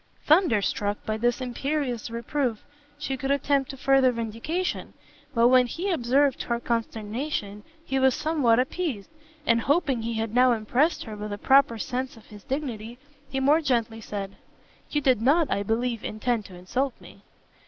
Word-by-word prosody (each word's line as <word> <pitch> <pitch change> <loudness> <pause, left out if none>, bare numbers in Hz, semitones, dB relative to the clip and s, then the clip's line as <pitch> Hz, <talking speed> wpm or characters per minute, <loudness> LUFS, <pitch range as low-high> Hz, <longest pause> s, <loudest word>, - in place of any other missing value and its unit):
Thunderstruck 215 - +2
by 215 0 -1
this 240 +3 0
imperious 255 -1 -2
reproof, 235 0 -2 0.3
she 275 -2 -3
could 270 +1 -4
attempt 280 0 +1
no 270 - -10
further 270 -1 +4
vindication; 230 +10 -3 0.4
but 235 +1 +5
when 255 -1 +5
he 365 +10 -3
observed 275 -2 +2
her 235 -1 -1
consternation, 225 -1 -3 0.2
he 270 0 0
was 265 -1 +4
somewhat 300 -7 +2
appeased, 260 - -2 0.3
and 230 -3 +3
hoping 275 -3 +1
he 230 +1 -3
had 220 0 -2
now 250 0 +5
impressed 245 +9 +1
her 220 -2 -7
with 210 0 -6
a 205 - -3
proper 265 +1 +4
sense 255 +2 -3
of 220 - -16
his 205 -2 -13
dignity, 245 -5 -4 0.3
he 270 -1 -2
more 290 +4 +4
gently 235 -6 0
said, 200 -2 -6 0.5
"You 295 - 0
did 255 -5 +3
not, 295 +5 +3
I 200 - +1
believe, 230 +2 -1
intend 215 0 -1
to 185 - -11
insult 245 +9 -2
me." - - -15
245 Hz, 165 wpm, -26 LUFS, 225-275 Hz, 0.5 s, but